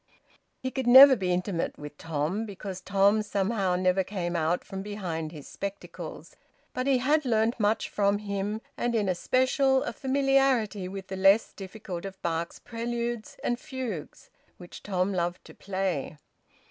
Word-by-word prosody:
He 260 Hz, -, -4 dB
could 260 Hz, -2 st, -3 dB
never 265 Hz, +2 st, +10 dB
be 185 Hz, -5 st, -1 dB
intimate 180 Hz, -1 st, -1 dB
with 150 Hz, 0 st, -9 dB
Tom, 165 Hz, +8 st, -2 dB
because 195 Hz, -2 st, -7 dB
Tom 200 Hz, +2 st, +3 dB
somehow 200 Hz, -2 st, 0 dB
never 185 Hz, +1 st, +2 dB
came 180 Hz, -3 st, -3 dB
out 165 Hz, +2 st, 0 dB
from 195 Hz, -1 st, -6 dB
behind 180 Hz, -6 st, -4 dB
his 150 Hz, -4 st, -10 dB
spectacles. 200 Hz, 0 st, -7 dB, 0.4 s
But 255 Hz, +1 st, -2 dB
he 270 Hz, -2 st, +4 dB
had 295 Hz, +5 st, +2 dB
learnt 230 Hz, -1 st, +1 dB
much 210 Hz, +1 st, +1 dB
from 200 Hz, 0 st, +1 dB
him, 205 Hz, +1 st, -3 dB
and 240 Hz, -1 st, -1 dB
in 210 Hz, -3 st, +1 dB
especial 260 Hz, +8 st, +2 dB
a -, -, -4 dB
familiarity 265 Hz, -7 st, +1 dB
with 190 Hz, 0 st, -7 dB
the 190 Hz, 0 st, -6 dB
less 195 Hz, +3 st, +4 dB
difficult 190 Hz, -3 st, -7 dB
of 195 Hz, -1 st, -8 dB
Bach's 170 Hz, 0 st, -2 dB
preludes 235 Hz, -1 st, -4 dB
and 240 Hz, 0 st, 0 dB
fugues, 260 Hz, -, -6 dB, 0.3 s
which 175 Hz, -1 st, -11 dB
Tom 190 Hz, 0 st, -1 dB
loved 175 Hz, 0 st, -2 dB
to -, -, -13 dB
play. 185 Hz, -7 st, -3 dB
200 Hz, 155 wpm, -28 LUFS, 185-235 Hz, 0.4 s, never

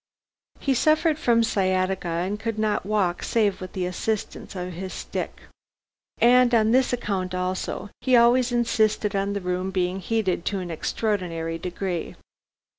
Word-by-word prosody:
He 275 Hz, -, +1 dB
suffered 310 Hz, +4 st, +3 dB
from 235 Hz, -5 st, +3 dB
sciatica, 185 Hz, -3 st, 0 dB
and 180 Hz, +5 st, -2 dB
could 225 Hz, 0 st, -3 dB
not 215 Hz, -2 st, 0 dB
walk 195 Hz, -5 st, +1 dB
save 210 Hz, -5 st, +1 dB
with 185 Hz, -, -7 dB
the 185 Hz, -1 st, -2 dB
assistance 200 Hz, +3 st, -3 dB
of 180 Hz, 0 st, -4 dB
his 185 Hz, +2 st, -6 dB
stick. -, -, -5 dB, 0.8 s
And 245 Hz, 0 st, +5 dB
on 220 Hz, -1 st, +4 dB
this 260 Hz, +1 st, +3 dB
account 190 Hz, -6 st, -2 dB
also, 185 Hz, +2 st, -3 dB
he 255 Hz, -1 st, +3 dB
always 240 Hz, +1 st, +5 dB
insisted 220 Hz, -3 st, +1 dB
on 200 Hz, +1 st, 0 dB
the 200 Hz, -, -3 dB
room 180 Hz, +1 st, -2 dB
being 185 Hz, 0 st, -1 dB
heated 190 Hz, -3 st, -1 dB
to 200 Hz, -, -1 dB
an 180 Hz, -2 st, -5 dB
extraordinary 165 Hz, -3 st, -2 dB
degree. 180 Hz, 0 st, -4 dB
200 Hz, 150 wpm, -25 LUFS, 185-230 Hz, 0.8 s, And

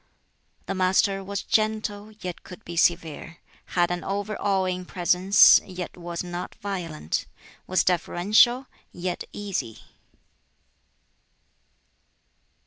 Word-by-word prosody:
The -, -, -3 dB
Master 195 Hz, +1 st, +2 dB
was 200 Hz, +1 st, -4 dB
gentle, 215 Hz, -1 st, -1 dB
yet 180 Hz, -2 st, -6 dB
could 180 Hz, -, -13 dB
be 170 Hz, -, -7 dB
severe; 165 Hz, -1 st, 0 dB, 0.4 s
had 175 Hz, 0 st, +3 dB
an 175 Hz, 0 st, -3 dB
over 205 Hz, +2 st, -3 dB
awing 190 Hz, -2 st, 0 dB
presence, 180 Hz, +2 st, +5 dB
yet 180 Hz, -2 st, -7 dB
was 170 Hz, -1 st, -5 dB
not 175 Hz, 0 st, -6 dB
violent; 170 Hz, -, -4 dB, 0.4 s
was 185 Hz, -, +2 dB
deferential, 205 Hz, +8 st, +3 dB, 0.3 s
yet 175 Hz, 0 st, -4 dB
easy. 195 Hz, -, -4 dB
185 Hz, 100 wpm, -25 LUFS, 175-200 Hz, 0.4 s, presence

